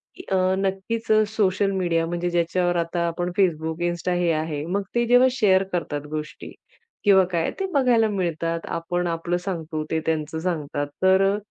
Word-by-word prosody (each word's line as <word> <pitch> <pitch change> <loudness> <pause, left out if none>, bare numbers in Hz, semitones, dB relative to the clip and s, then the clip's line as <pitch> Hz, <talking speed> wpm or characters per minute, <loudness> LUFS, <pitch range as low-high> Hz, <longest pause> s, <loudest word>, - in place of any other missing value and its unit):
की 365 - -10
अ, 190 - +3 0.2
नक्कीच 195 +4 -2
अ, 215 0 +5
social 200 -2 +1
media 170 -3 0
म्हणजे 175 +1 -2
ज्याच्यावर 175 +1 +1
आता 170 0 -1
आपण 175 +1 -2
Facebook, 160 -3 +1
Insta 175 +1 -2
हे 175 -1 +2
आहे. 155 -1 -3
मग 195 +3 -1
ते 240 0 +2
जेव्हा 245 +2 +6
शेअर 195 -7 +3
करतात 155 -4 -2
गोष्टी 150 -1 -6 0.5
किंवा 195 -2 +6
काय, 165 -1 0
ते 385 - 0
बघायला 245 -5 +3
मिळतात. 165 -4 -1
आपण 175 +1 -2
आपलं 170 +1 -1
सांगतो, 165 -4 -4
ते 160 - +1
त्यांचं 160 0 -1
सांगतात. 150 -4 -2 0.2
तर 190 +1 +5
अ, - - -2
175 Hz, 170 wpm, -23 LUFS, 165-195 Hz, 0.5 s, जेव्हा